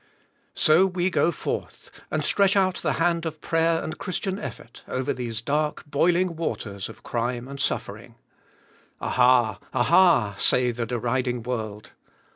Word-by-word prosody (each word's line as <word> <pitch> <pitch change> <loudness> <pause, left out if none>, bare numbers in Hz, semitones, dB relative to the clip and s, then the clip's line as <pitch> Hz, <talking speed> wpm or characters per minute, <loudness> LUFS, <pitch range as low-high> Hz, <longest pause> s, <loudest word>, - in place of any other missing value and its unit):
So 165 +5 +5
we 180 0 -1
go 175 - +2
forth; - - -5 0.2
and - - -1
stretch 200 -1 +3
out 185 -2 +2
the - - -1
hand 170 0 +1
of 160 -2 -5
prayer 165 0 +1
and 155 - -6
Christian 190 +1 -2
effort 120 - -9
over 130 0 -2
these 115 -3 -4
dark, 150 +3 -1
boiling 170 +4 +1
waters 100 -11 -4
of - - -13
crime 120 +1 -3
and 140 0 -8
suffering. 135 - -3 0.8
"Aha! 125 -4 +3
Aha!" 120 - +4
say 125 -1 +3
the 115 0 -4
deriding 125 0 -1
world. 110 -4 -5
135 Hz, 140 wpm, -25 LUFS, 120-170 Hz, 0.8 s, So